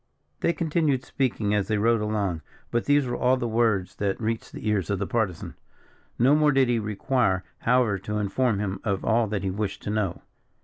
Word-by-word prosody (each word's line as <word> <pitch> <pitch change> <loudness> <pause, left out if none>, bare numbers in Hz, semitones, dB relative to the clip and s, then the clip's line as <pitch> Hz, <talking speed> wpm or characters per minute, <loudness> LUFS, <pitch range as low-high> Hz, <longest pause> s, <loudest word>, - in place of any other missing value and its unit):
They - - +2
continued 155 -5 0
speaking 115 -6 -1
as 105 -2 +1
they 110 - 0
rode 115 +1 +2
along; 100 -6 -1 0.3
but 120 - 0
these 145 -1 +3
were 120 -1 -2
all 125 +1 +2
the 120 - -2
words 110 -5 +1
that 100 -1 -1
reached 115 0 -3
the - - -7
ears 100 -6 0
of 100 - 0
the 100 - -2
Partisan. 95 -4 -2 0.6
No 130 +4 +4
more 150 -1 +4
did 135 -2 +3
he 120 -1 +2
require, 105 -2 0 0.2
however, 120 -5 +2
to 105 +2 -4
inform 105 +2 +1
him 100 -1 -3
of 100 -4 -1
all 115 0 +3
that 100 -2 -3
he 95 - -1
wished 100 0 -4
to 105 - -3
know. 105 -4 -2
110 Hz, 205 wpm, -26 LUFS, 100-125 Hz, 0.6 s, No